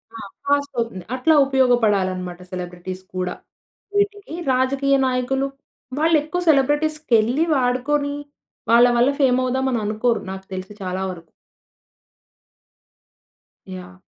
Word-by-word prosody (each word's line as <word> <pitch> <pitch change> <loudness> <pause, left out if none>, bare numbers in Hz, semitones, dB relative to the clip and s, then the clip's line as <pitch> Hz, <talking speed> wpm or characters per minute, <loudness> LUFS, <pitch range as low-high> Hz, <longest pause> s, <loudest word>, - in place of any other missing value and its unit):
ఆ! - - -7 0.3
ఫాస్ట్ 285 0 +1
అవుతుంది. 230 -6 -3
అట్లా 285 +5 +3
ఉపయోగపడాలి 245 -8 +3
అన్నమాట 180 -1 -7
సెలబ్రిటీస్ 180 +1 -6
కూడా. 180 0 -2 0.6
వీటికి 405 -3 -1 0.2
రాజకీయ 275 +2 +2
నాయకులు 260 +2 0 0.5
వాళ్ళు 325 +1 +3
ఎక్కువ 355 +4 -3
సెలబ్రిటీస్‌కెళ్ళి, 290 -3 +2
వాడుకొని 280 +3 0 0.6
వాళ్ళ 235 +1 +7
వల్ల 245 +3 +4
ఫేమ్ 255 -2 +3
అవుదాం 260 +1 0
అని 235 - +1
అనుకోరు. 220 +2 0
నాకు 190 0 -8
తెలిసి 185 +2 -6
చాలా 185 +1 -3
వరకు. 170 -3 -12 2.4
యాహ్! 90 0 -9
250 Hz, 110 wpm, -21 LUFS, 190-280 Hz, 2.4 s, వాళ్ళ